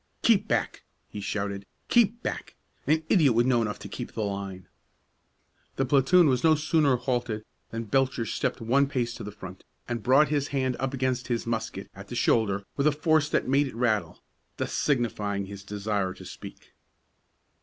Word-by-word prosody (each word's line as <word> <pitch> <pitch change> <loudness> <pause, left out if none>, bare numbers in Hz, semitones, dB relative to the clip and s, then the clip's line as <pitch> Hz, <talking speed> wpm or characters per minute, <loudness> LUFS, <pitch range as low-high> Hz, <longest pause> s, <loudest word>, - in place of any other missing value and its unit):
"Keep 215 -2 +4
back!" - - -1 0.3
he 105 - -7
shouted; 100 0 -3 0.2
"keep 235 0 +3
back! - - -4 0.3
An 155 +1 +3
idiot 145 - +4
would 120 +1 +4
know 125 -2 +3
enough 105 -2 -2
to - - -9
keep - - -7
the 110 - -2
line!" 100 -2 -5 1.1
The 135 - 0
platoon 140 +7 +5
was 130 -3 +1
no 160 -1 +6
sooner 150 -2 +2
halted 120 -3 -2 0.2
than 115 0 -4
Belcher 130 +1 +1
stepped - - -2
one 135 +5 +3
pace 120 -4 -1
to - - -8
the 105 - -6
front, 95 -2 -10 0.2
and 120 -2 -3
brought 135 +6 +4
his 145 -2 0
hand 130 -2 -1
up 135 0 -2
against 130 -1 -1
his 120 -2 -1
musket 115 -1 -3
at - - -10
the - - -6
shoulder 100 -3 +2
with 140 +1 +3
a - - +5
force 155 0 +2
that - - 0
made 140 +2 +3
it 130 - -9
rattle, 115 -3 -1 0.3
thus - - -3
signifying 105 -7 0
his 100 0 -9
desire 100 -2 -2
to - - -12
speak. - - -11
125 Hz, 180 wpm, -27 LUFS, 105-140 Hz, 1.1 s, no